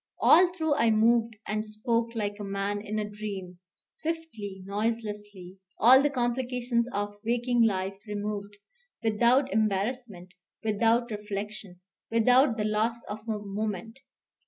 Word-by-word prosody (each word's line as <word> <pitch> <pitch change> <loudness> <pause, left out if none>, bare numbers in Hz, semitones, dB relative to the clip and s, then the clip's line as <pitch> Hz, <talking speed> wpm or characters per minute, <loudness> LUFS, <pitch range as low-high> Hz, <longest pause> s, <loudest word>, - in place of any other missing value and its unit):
All 355 +2 +6
through 320 -4 0
I 230 -4 +4
moved 225 +1 +3
and 215 0 -1
spoke 230 +2 -1
like 205 -2 -2
a - - -5
man 200 +1 -2
in 215 +1 -4
a 210 -1 -1
dream; 200 -4 -7 0.3
swiftly, 255 - -5
noiselessly, 205 -3 -4 0.2
all 255 +4 +7
the 290 - +2
complications 245 -1 -1
of 205 -1 -3
waking 240 +1 +1
life 195 -3 +1
removed; 205 0 -4 0.5
without 240 +5 +3
embarrassment, 210 -2 -1 0.3
without 225 +2 +2
reflection, 210 -3 -6 0.3
without 245 +2 +4
the 210 - 0
loss 220 +2 0
of 210 - -4
a 215 - 0
moment. 210 +3 -4
215 Hz, 130 wpm, -28 LUFS, 205-235 Hz, 0.5 s, all